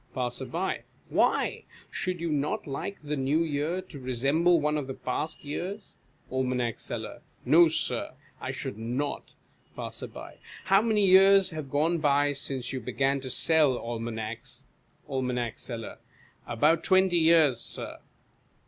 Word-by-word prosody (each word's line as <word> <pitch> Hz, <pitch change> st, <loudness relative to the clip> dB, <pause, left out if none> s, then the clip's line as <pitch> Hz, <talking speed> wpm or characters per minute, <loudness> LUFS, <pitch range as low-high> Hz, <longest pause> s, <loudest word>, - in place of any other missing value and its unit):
Passer. 125 Hz, +1 st, -2 dB, 0.6 s
Why? -, -, +1 dB, 0.3 s
Should 185 Hz, -3 st, -3 dB
you 170 Hz, -1 st, -1 dB
not 145 Hz, 0 st, -1 dB
like 145 Hz, +8 st, -5 dB
the 150 Hz, 0 st, -2 dB
New 145 Hz, +4 st, +1 dB
Year 160 Hz, +4 st, -2 dB
to 170 Hz, -6 st, -11 dB
resemble 140 Hz, +8 st, +2 dB
one 150 Hz, 0 st, 0 dB
of 145 Hz, -3 st, -2 dB
the 135 Hz, -, -5 dB
past 145 Hz, +5 st, -4 dB
years? 190 Hz, +8 st, -5 dB, 0.4 s
Aim. 130 Hz, -1 st, 0 dB, 0.2 s
Seller. -, -, -6 dB, 0.2 s
No, 170 Hz, +2 st, +7 dB
Sir, 160 Hz, -, 0 dB, 0.3 s
I -, -, -4 dB
should 105 Hz, -, -5 dB
not. 125 Hz, +6 st, -3 dB, 0.4 s
Passer. -, -, -6 dB, 0.6 s
How 195 Hz, +1 st, +5 dB
many 215 Hz, -3 st, +2 dB
years 195 Hz, 0 st, +6 dB
have 155 Hz, -4 st, -6 dB
gone 160 Hz, +5 st, +1 dB
by 145 Hz, -1 st, +3 dB
since 135 Hz, -3 st, -4 dB
you 130 Hz, -, -2 dB
began 135 Hz, +3 st, 0 dB
to 130 Hz, -, -6 dB
sell 150 Hz, -1 st, +3 dB
almanacs? 115 Hz, +2 st, -5 dB, 0.4 s
Aim. 130 Hz, -3 st, -2 dB, 0.2 s
Seller. 115 Hz, -3 st, -7 dB, 0.5 s
About 155 Hz, +8 st, +2 dB
twenty 185 Hz, -2 st, +4 dB
years. 160 Hz, -6 st, +5 dB
Sir. -, -, -3 dB
145 Hz, 135 wpm, -28 LUFS, 130-170 Hz, 0.6 s, No